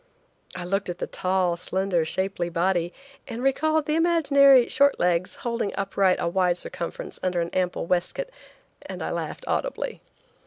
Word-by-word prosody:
I 180 -1 -5
looked 195 +1 -1
at 175 - -4
the - - -3
tall, 185 -1 0
slender, 180 -1 0
shapely 180 +1 -1
body, 175 0 0 0.4
and 235 +2 -5
recalled 310 +3 +2
the 300 - -1
imaginary 280 -6 +5
short 280 +1 +3
legs, 175 0 +1
holding 235 -3 -2
upright 195 -1 +1
a - - -1
wide 180 0 +1
circumference 170 -1 -6
under 180 -1 0
an 170 0 -2
ample 180 -2 -1
waistcoat, 185 - -1 0.6
and - - -6
I - - -3
laughed - - -5
audibly. - - -2
190 Hz, 155 wpm, -25 LUFS, 175-270 Hz, 0.6 s, imaginary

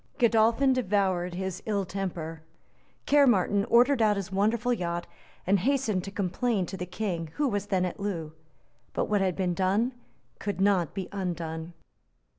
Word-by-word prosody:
Godolphin 235 +2 +4
devoured 190 -6 0
his 190 0 -4
ill 200 -3 0
temper. 170 -4 -4 0.6
Caermarthen 210 -8 +4
ordered 245 +2 +4
out 210 -2 +3
his 195 -1 -4
wonderful 220 +5 +1
yacht, 175 -5 -2 0.4
and 195 +2 +3
hastened 230 -4 +1
to - - -5
complain 200 +1 -1
to 190 - -6
the 180 -1 -5
King, 175 -4 -3
who 295 - +1
was 205 -4 -2
then 185 -2 +1
at 180 - -5
Loo. 170 -6 -3 0.6
But - - 0
what 205 -2 +1
had 185 -2 +1
been 185 -2 0
done 195 +7 +1 0.5
could 200 -3 -3
not 190 -5 +2
be 190 -2 -3
undone. 170 -3 -4
195 Hz, 155 wpm, -28 LUFS, 180-220 Hz, 0.6 s, Godolphin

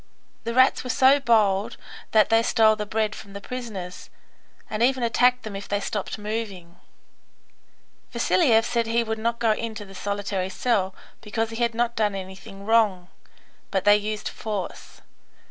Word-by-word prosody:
The 230 0 -3
rats 260 +1 +4
were 250 - -6
so 265 +4 +5
bold 220 -4 +2 0.3
that 215 -2 +4
they 225 0 +5
stole 220 -2 +4
the 210 -1 -5
bread 215 0 0
from 200 -2 -11
the 200 - -6
prisoners, 200 -6 -7 0.6
and 215 +1 -4
even 255 +1 +2
attacked 250 +2 +3
them 215 -2 -6
if 200 +1 -7
they 205 - 0
stopped 205 +1 -4
moving. 205 -5 -5 1.3
Vasiliev 230 -10 +3
said 235 -2 0
he 230 +1 +2
would 220 -1 -3
not 230 +1 -1
go 230 -1 +2
into 215 -1 -3
the 195 - -13
solitary 200 -1 -3
cell, 195 -2 0 0.3
because 225 +1 -2
he 225 - -6
had 235 -1 +1
not 235 0 0
done 210 -3 +1
anything 195 +1 -9
wrong; 205 -5 +2 0.6
but 190 -1 -1
they 205 0 +7
used 210 0 -3
force. 210 -4 -6
220 Hz, 165 wpm, -24 LUFS, 200-230 Hz, 1.3 s, they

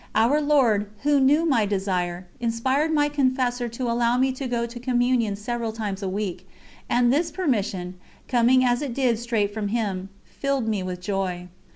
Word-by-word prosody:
Our 240 +8 +3
Lord, 245 -9 +2
Who 290 -1 +3
knew 290 +5 +4
my 235 -10 +2
desire, 185 -3 -2
inspired 260 +6 0
my 295 -2 +3
confessor 255 -4 0
to 235 +3 -6
allow 235 0 +1
me 260 +1 +2
to 260 +1 -5
go 235 -1 -1
to 235 +1 -8
Communion 245 -3 +1
several 230 +2 -3
times 210 -3 -4
a 195 - -2
week, 195 -1 -4 0.4
and 245 0 +3
this 325 +4 +1
permission, 205 - -2 0.3
coming 255 +1 +4
as 245 +1 +2
it 270 -5 -4
did 245 -5 +1
straight 225 -4 -1
from 215 -1 -2
Him, 200 -4 -2 0.2
filled 275 -4 -2
me 215 -3 0
with 180 -1 -5
joy. 180 -2 -3
235 Hz, 175 wpm, -24 LUFS, 205-260 Hz, 0.4 s, knew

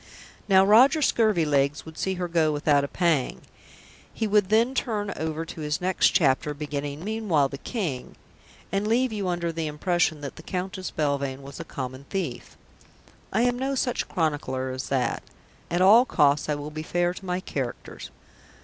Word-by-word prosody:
Now 190 0 +6
Roger 250 +10 +6
Scurvilegs 150 - +2
would 160 -1 -10
see 190 +4 -2
her 180 -1 -3
go 165 -2 +2
without 145 -1 +2
a - - -1
pang; 160 -5 0 0.7
he 225 - -2
would 205 -2 +2
then 230 +4 +3
turn 210 -6 -2
over 160 0 -3
to 165 - -8
his 150 0 -1
next 185 +1 +2
chapter, 145 -1 +2
beginning 145 +1 -5
"Meanwhile 200 -10 +1
the 140 - -7
King 165 - -4 0.3
," - - -26
and 195 +2 0
leave 240 +2 +2
you 200 -3 -2
under 175 -1 -1
the 165 -1 -3
impression 155 0 0
that 140 - -7
the - - -9
Countess 185 +2 -4
Belvane 140 -2 -2
was 140 0 -10
a - - -4
common 130 -3 -7
thief. 195 -1 -4 0.7
I 225 - +1
am 245 0 +1
no 270 +1 -1
such 250 -1 -1
chronicler 145 -6 -1
as 130 0 -5
that. 130 -3 0 0.5
At 175 +2 +1
all 220 +6 +7
costs 145 - +2
I 150 - +1
will 145 +1 -6
be 155 +1 -5
fair 175 +2 0
to 190 - -11
my 180 -1 -2
characters. 135 -9 -6
165 Hz, 175 wpm, -25 LUFS, 145-195 Hz, 0.7 s, all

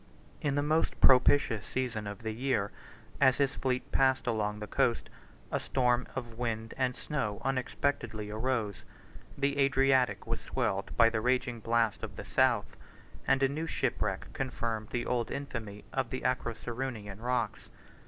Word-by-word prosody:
In 140 -2 0
the 145 - +2
most 155 +2 +1
propitious 125 -4 +5
season 120 -5 -2
of 100 +2 -7
the 110 - -2
year, 115 -3 0 0.5
as 130 -1 +6
his 140 -2 +1
fleet 125 -1 -1
passed 130 -1 +3
along 105 -3 0
the 105 - -5
coast, - - 0 0.4
a - - +1
storm 125 -1 +1
of 120 -3 -6
wind 115 -2 -2
and 130 -2 0
snow 105 -9 -3
unexpectedly 130 -4 -1
arose: 110 -2 -1 0.5
the 140 0 0
Adriatic 135 -2 +3
was - - -3
swelled - - -1
by 115 0 +6
the 110 -1 0
raging 125 -1 +1
blast 115 -1 +1
of - - -6
the - - -7
south, - - +2 0.5
and 135 0 +3
a - - +6
new 155 +4 -3
shipwreck - - -1
confirmed 115 -4 -2
the 120 -1 -2
old 120 -2 0
infamy 115 -7 -5
of 135 -3 0
the 130 - -3
Acroceraunian 120 -4 -3
rocks. 125 +1 -1
125 Hz, 155 wpm, -31 LUFS, 110-135 Hz, 0.5 s, as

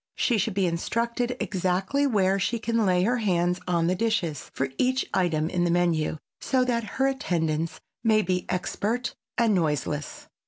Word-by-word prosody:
She 235 -4 +2
should 210 0 -1
be 195 -2 +2
instructed 235 +8 -1
exactly 190 +9 0
where 195 -5 +2
she 230 +5 0
can 230 -1 0
lay 180 -1 +3
her 245 +5 +2
hands 180 -5 +1
on 170 -2 +2
the 175 - +2
dishes 185 - -1
for 135 0 -2
each 260 +1 +2
item 165 -4 +1
in 175 0 0
the 175 - +2
menu 170 -3 +1 0.2
so 260 -1 +1
that 235 -2 0
her 265 - +3
attendance 165 - -1 0.2
may 215 -2 +4
be 180 0 -1
expert 215 +6 -1 0.2
and 230 -2 +3
noiseless. 150 -4 -2
190 Hz, 165 wpm, -26 LUFS, 175-235 Hz, 0.2 s, may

